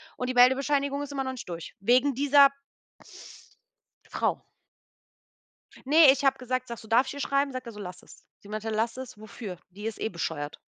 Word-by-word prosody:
und 250 - -4
die - - -1
Meldebescheinigung 275 +3 +3
ist 290 0 -6
immer 275 -1 -2
noch 260 - -2
nicht 245 -7 -9
durch 170 -1 -7
wegen 255 +6 +3
dieser 280 +1 +6 1.6
Frau. - - -1 1.4
Ne, 300 0 +7
ich 270 +1 -2
habe 270 -1 +3
gesagt 255 0 -3
sage 235 -1 -7
so: 220 - -14
„Darf 240 +4 +3
ich - - -5
ihr 285 - -8
schreiben?“ 275 0 0
Sagt 255 -2 -6
er 230 - -8
so: 210 - -11
„Lass 180 -3 -8
es.“ - - -17 0.2
Sie - - -17
meinte: 215 +1 -5
„Lass 225 +2 -1
es. 255 -4 -9
Wofür? 215 -3 -8
Die 205 +4 -10
ist 225 - -4
eh - - -1
bescheuert.“ 160 -4 -4
250 Hz, 195 wpm, -27 LUFS, 215-275 Hz, 1.6 s, Ne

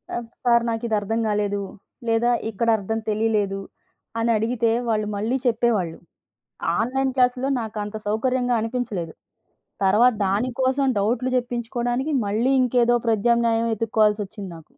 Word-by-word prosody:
ఆ - - -1 0.3
సార్ 235 -1 +4
నాకు 225 0 -3
ఇది 220 - +1
అర్థం 225 +3 -2
కాలేదు 205 -1 0 0.5
లేదా 230 +1 +2 0.2
ఇక్కడ 230 +2 -1
అర్థం 220 +2 -3
తెలియలేదు 210 -2 0 0.6
అని 230 +1 +1
అడిగితే, 230 +1 +1 0.2
వాళ్ళు 215 -1 0
మళ్ళీ 225 +6 0
చెప్పేవాళ్ళు. 220 -8 +1 0.8
ఆన్‍లైన్ 265 +3 0
క్లాస్‌లో 250 +1 +2
నాకు 220 -1 -6
అంత 210 +1 -7
సౌకర్యంగా 245 +3 +1
అనిపించలేదు, 220 -8 -3 0.7
తర్వాత 225 +6 +5
దాని 205 +7 0
కోసం 265 +2 +2
డౌట్‌లు 240 +5 0
చెప్పించుకోవడానికి 245 +3 -2
మళ్ళీ 230 +6 +1
ఇంకేదో 240 -1 +3
ప్రద్యామ్నాయం 230 +1 +2
వెతుక్కోవాల్సి 215 -1 +2
వచ్చింది 200 -1 -9
నాకు. 165 - -12
225 Hz, 130 wpm, -23 LUFS, 210-245 Hz, 0.8 s, తర్వాత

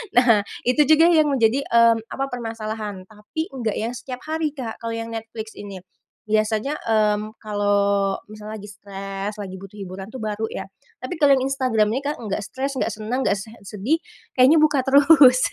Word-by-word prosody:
Nah, 230 -5 +5 0.2
itu 255 +4 +5
juga 315 +3 +6
yang 310 -4 +4
menjadi, 255 +1 +2
mmm, 230 0 +5 0.2
apa, 270 - -2
permasalahan 220 -5 -5
tapi 215 +10 -6
enggak 230 -4 -2
yang 230 +3 -2
setiap 250 0 -7
hari, 315 -1 -1
Kak, 245 -6 -7
kalau 230 - -2
yang 230 0 -4
Netflix 225 0 -7
ini. 200 -2 -8 0.5
Biasanya, 215 +6 +1
mmm, 215 -1 +1
kalau 200 -2 +1
misalnya 215 0 -8
lagi 205 - -10
stress, 200 0 -6
lagi 190 -2 -6
butuh 195 +1 -12
hiburan 190 0 -7
itu 260 - -7
baru 215 0 -3
ya. 195 - -5 0.3
Tapi 255 +7 -5
kalau 280 -2 +6
yang 260 - -1
Instagram 255 -6 +1
ini, 270 - -1
Kak, 290 +1 -3
nggak 210 -2 -3
stress, 270 +6 -4
nggak 235 -3 -1
senang, 225 +5 -3
nggak 200 - +2
se 195 - -8 0.2
sedih, 210 +10 -1 0.4
kayaknya 270 +5 +6
buka 295 -3 +3
terus, 280 -1 +7
225 Hz, 180 wpm, -22 LUFS, 210-265 Hz, 0.5 s, terus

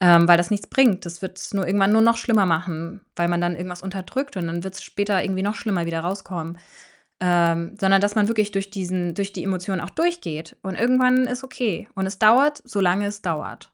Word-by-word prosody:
ähm, 170 -2 +7
weil 175 -1 +8
das 175 0 0
nichts 205 -2 -2
bringt. 245 -8 +3
Das 170 +1 -8
wird's 190 0 -7
nur 195 -2 -1
irgendwann 195 +2 +3
nur 220 - +5
noch 230 +1 +5
schlimmer 225 -4 +2
machen, 170 +2 -2
weil 170 0 0
man 175 0 0
dann 175 -1 0
irgendwas 180 0 -7
unterdrückt 195 +8 -5
und 175 - -2
dann 170 +2 -4
wird's 190 0 -7
später 205 -2 -1
irgendwie 190 0 -2
noch 205 +2 -1
schlimmer 195 -7 -2
wieder 165 -1 -2
rauskommen. 175 -2 -5 0.7
Ähm, 170 +1 +2
sondern 195 -1 +4
dass 205 +1 0
man 210 -1 +3
wirklich 215 -2 0
durch 195 0 -3
diesen 180 -3 -3
durch 200 +3 -3
die - - -6
Emotion 190 0 -2
auch 175 +2 -7
durchgeht 305 - -3
und 190 -1 -4
irgendwann 255 +3 +3
ist 250 +1 -4
okay 230 -7 -3
und 190 -1 -2
es 190 0 -6
dauert, 265 +8 +5
solange 200 -3 +1
es 205 0 -5
dauert. 160 -4 -4
190 Hz, 215 wpm, -22 LUFS, 175-210 Hz, 0.7 s, weil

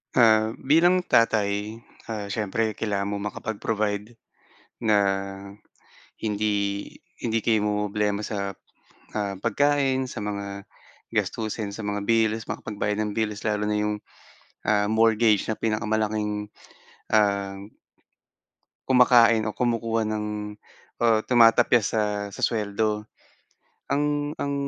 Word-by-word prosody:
Ah, 110 -2 +5
bilang 170 +6 +4
tatay, 105 -1 +1 0.3
ah, 105 -2 -4
siyempre 105 +1 -1
kailangan 100 -2 -2
mong 100 +1 -3
makapag-provide 110 0 -3 0.7
na 110 -1 +4 1.3
hindi, 105 -1 0 0.6
hindi 115 -1 -1
kayo 110 -1 +2
mamromroblema 105 0 0
sa, 100 -2 -3 0.6
ah, 100 -2 -2
pagkain, 130 +3 +1
sa - - -7
mga 100 -1 -5 0.5
gastusin 110 -1 -2
sa 105 +1 -6
mga 105 0 -2
bills 110 0 +1
makapagbayad 105 0 -3
ng 105 -1 -2
bills 110 -1 -2
lalo 105 0 0
na 105 - +1
'yong, 105 0 -2 0.6
ah, 105 0 +2
mortgage 110 -1 +3
na 110 - -1
pinakamalaking 105 -1 -1 0.6
ah 100 -2 +2 1.3
kumakain 120 -3 +5
o 105 - -1
kumukuha 115 -2 0
ng 105 0 -2 0.8
o - - +3 0.2
tumatapyas 120 -1 +5
sa 110 - +2 0.3
sa - - -8
suweldo 105 -1 -1 0.8
ang, 145 0 0
ang 140 0 -2
110 Hz, 105 wpm, -25 LUFS, 105-115 Hz, 1.3 s, Ah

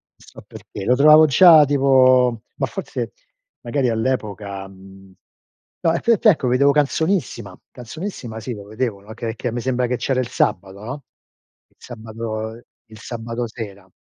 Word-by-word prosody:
so - - -16
perché, 100 - -10
lo 125 - +3
trovavo 155 +3 +7
già 160 +1 +7
tipo 130 -4 +3 0.2
ma - - 0
forse - - -6 0.5
magari 135 -4 -1
all'epoca 105 -5 -3
mhmm, 95 0 -16 0.7
no, 165 - +2
e - - -1
te 235 - +1
e - - +2
t - - -24
ecco, 150 -10 +3
vedevo 140 +3 +3
Canzonissima, 155 - -1
Canzonissima 125 - -7
sì, 120 +3 -6
lo 100 -2 -10
vedevo, 110 -1 -4
no, 110 +2 -11
che 115 0 -5
che 120 +1 -4
me 120 0 -4
sembra 125 -1 -1
che 125 0 -2
c'era 130 -2 -1
il 125 - -1
sabato, 95 +1 -1
no, 130 +7 -7 0.6
il - - -38
sabato 110 -1 -7 0.3
il 110 -1 -14
sabato 115 0 -5
sera. 100 -4 -9
120 Hz, 160 wpm, -20 LUFS, 110-135 Hz, 0.7 s, trovavo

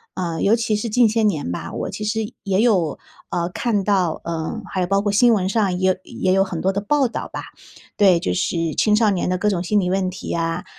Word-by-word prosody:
嗯， 170 -3 -3
尤 215 +3 +4
其 225 -2 0
是 210 +3 -3
近 240 0 +4
些 220 +1 +1
年 155 - 0
吧， 85 - -5
我 - - -3
其 215 - -6
实 215 0 -2
也 195 +1 +1
有， 185 - +2 0.3
呃， 170 0 -1
看 205 +1 -1
到， 185 -4 +1
呃， 170 +7 -4
还 190 - -2
有 180 - +1
包 195 +2 +1
括 205 0 0
新 235 +3 +5
闻 190 -3 0
上 195 -5 0
也 185 - +3
有 185 - +2
也 185 0 -1
有 195 0 +4
很 175 -4 -5
多 190 - +2
的 200 +1 -2
报 280 +5 +2
道 235 - -5
吧。 - - -4 0.6
对， 190 -4 +5
就 90 - -2
是 160 - -1
青 210 -1 +3
少 215 0 +3
年 190 -3 0
的 180 0 -1
各 210 +2 +2
种 180 -3 -1
心 205 +3 +2
理 180 - 0
问 185 0 0
题 190 - -9
呀， 165 0 -2
195 Hz, 265 characters per minute, -21 LUFS, 175-215 Hz, 0.6 s, 新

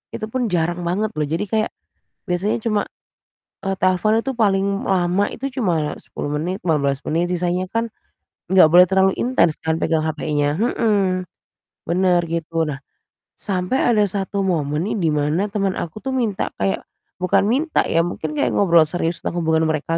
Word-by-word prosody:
itu 215 - -4
pun 250 +1 -1
jarang 175 +1 0
banget 195 +5 -1
loh. 150 -1 -1
Jadi 165 +7 -1
kayak 215 +2 0 0.6
biasanya 180 +4 0
cuma, 215 -3 +1 0.8
eee, 195 - +1
telepon 185 +4 +3
itu 265 +2 -4
paling 200 -3 +2 0.2
lama 185 +1 +2
itu 270 - -5 0.2
cuma 160 -6 0
10 145 - -6
menit, 180 +5 -3
15 140 -4 +1
menit, 170 +3 0
sisanya 180 +1 0
kan 230 +1 0 0.7
enggak 185 -4 +7
boleh 180 +1 +8
terlalu 190 0 +4
intens 235 -11 +2
kan 160 0 0
pegang 160 -1 +1
HP-nya, 150 -1 -1
mhm, 200 -6 +1 0.6
benar, 180 +1 +2
gitu. 165 0 -1
Nah 145 -2 -4 0.6
sampai 190 +6 -1 0.2
ada 210 - +4
1 195 +1 -2
momen 150 -3 0
nih, - - -2
di 165 - +2
mana 150 +6 0
teman 195 -2 -1
aku 170 +4 -5
tuh 265 - -2
minta 225 -6 -1
kayak 95 0 0 0.4
bukan 185 +2 +2
minta, 290 +8 +1
ya, 165 - +2
mungkin 155 -3 -4
kayak - - +1
ngobrol 170 -5 +5
serius 165 0 -3
tentang 175 - -2
hubungan 160 0 +2
mereka 155 +1 -1
180 Hz, 165 wpm, -21 LUFS, 160-200 Hz, 0.8 s, boleh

